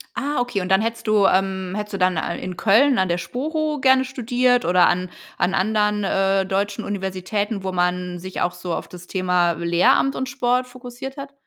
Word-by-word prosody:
Ah, 290 Hz, -1 st, -2 dB
okay. 245 Hz, -5 st, -1 dB
Und 180 Hz, -, -4 dB
dann 190 Hz, +2 st, +4 dB
hättest 230 Hz, 0 st, -3 dB
du, 210 Hz, -2 st, +4 dB
ähm 190 Hz, -1 st, +1 dB
hättest 210 Hz, 0 st, -5 dB
du -, -, -2 dB
dann 185 Hz, -2 st, +2 dB
a 170 Hz, -, -3 dB
in 185 Hz, 0 st, -6 dB
Köln 245 Hz, +7 st, +4 dB
an 190 Hz, -, +2 dB
der 175 Hz, 0 st, 0 dB
Sporo 300 Hz, -, -3 dB
gerne 265 Hz, 0 st, +4 dB
studiert 250 Hz, -1 st, +1 dB
oder 180 Hz, 0 st, +4 dB
an 180 Hz, 0 st, 0 dB, 0.3 s
an 190 Hz, +2 st, +1 dB
anderen, 210 Hz, +1 st, +1 dB
äh, 195 Hz, 0 st, +1 dB
deutschen 200 Hz, +3 st, -2 dB
Universitäten, 200 Hz, +1 st, -3 dB
wo 190 Hz, -, -2 dB
man 180 Hz, 0 st, -1 dB
sich 185 Hz, +1 st, -7 dB
auch 175 Hz, 0 st, 0 dB
so 175 Hz, -1 st, -4 dB
auf -, -, -5 dB
das 180 Hz, 0 st, -12 dB
Thema 180 Hz, -2 st, +1 dB
Lehramt 175 Hz, +12 st, +2 dB
und 260 Hz, -, -3 dB
Sport 250 Hz, -1 st, 0 dB
fokussiert 255 Hz, +2 st, -9 dB
hat? 275 Hz, 0 st, -8 dB
200 Hz, 200 wpm, -22 LUFS, 185-245 Hz, 0.3 s, dann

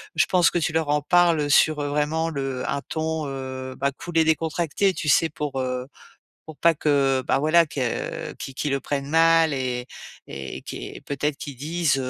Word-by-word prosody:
je -, -, +4 dB
pense 180 Hz, -2 st, +4 dB
que 175 Hz, -, 0 dB
tu 160 Hz, -1 st, -1 dB
leur 160 Hz, -2 st, 0 dB
en 150 Hz, 0 st, +2 dB
parles, 170 Hz, +1 st, +4 dB
heu, 145 Hz, -, -1 dB
sur 150 Hz, +1 st, +4 dB
heu, 145 Hz, -, -2 dB
vraiment 150 Hz, +2 st, 0 dB
le 135 Hz, -3 st, -3 dB
un 140 Hz, 0 st, -1 dB
ton, 160 Hz, 0 st, -2 dB
heu, 130 Hz, -1 st, -6 dB
bah, 140 Hz, +1 st, 0 dB
cool 175 Hz, -1 st, -4 dB
et 160 Hz, -, +5 dB
décontracté. 165 Hz, +4 st, +1 dB
Tu 155 Hz, -, -5 dB
sais? 160 Hz, +3 st, +4 dB
Pour, 145 Hz, -2 st, -4 dB
heu, 125 Hz, 0 st, -3 dB, 0.6 s
pour 160 Hz, -2 st, -11 dB
pas 170 Hz, +3 st, +4 dB
que, 140 Hz, -3 st, +2 dB
bah, -, -, +2 dB
voilà 155 Hz, +4 st, +4 dB
que 130 Hz, -5 st, -3 dB
qui 135 Hz, -, -7 dB
qu'ils 145 Hz, +1 st, -2 dB
le 140 Hz, -, 0 dB
prennent 140 Hz, 0 st, -3 dB
mal 165 Hz, 0 st, +4 dB
et 125 Hz, -2 st, -3 dB, 0.4 s
et 70 Hz, 0 st, -7 dB
qui -, -, -7 dB
est -, -, -10 dB
peut-être 140 Hz, +1 st, -2 dB
qu'ils 145 Hz, -5 st, -7 dB
disent: 155 Hz, +1 st, 0 dB
150 Hz, 205 wpm, -24 LUFS, 135-160 Hz, 0.6 s, et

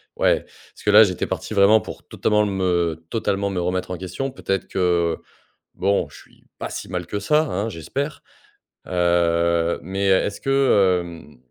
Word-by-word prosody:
ouais, -, -, +2 dB
parce -, -, -20 dB
que 105 Hz, -, +4 dB
là, 105 Hz, +2 st, +9 dB
j'étais 90 Hz, -4 st, -1 dB
parti -, -, -4 dB
vraiment 105 Hz, +2 st, +5 dB
pour -, -, -10 dB
totalement 105 Hz, -1 st, +1 dB
me 90 Hz, -4 st, 0 dB
totalement 100 Hz, -3 st, -1 dB
me 95 Hz, -, -2 dB
remettre 90 Hz, +1 st, -2 dB
en 90 Hz, -, -3 dB
question. 95 Hz, +10 st, -4 dB
Peut-être 95 Hz, -7 st, -3 dB
que 85 Hz, -3 st, +1 dB, 0.6 s
bon, 100 Hz, +1 st, 0 dB
je -, -, -14 dB
suis -, -, -21 dB, 0.2 s
pas -, -, -4 dB
si -, -, -7 dB
mal 90 Hz, -2 st, -3 dB
que 100 Hz, -, -3 dB
ça, 150 Hz, +10 st, +2 dB
hein, 105 Hz, -5 st, -2 dB
j'espère. 135 Hz, -, -4 dB, 0.7 s
Heu, 85 Hz, -1 st, +1 dB
mais 95 Hz, +3 st, -3 dB
est-ce 95 Hz, +1 st, +1 dB
que, 105 Hz, -10 st, +3 dB
hem, 85 Hz, -5 st, -11 dB
95 Hz, 165 wpm, -22 LUFS, 85-105 Hz, 0.7 s, là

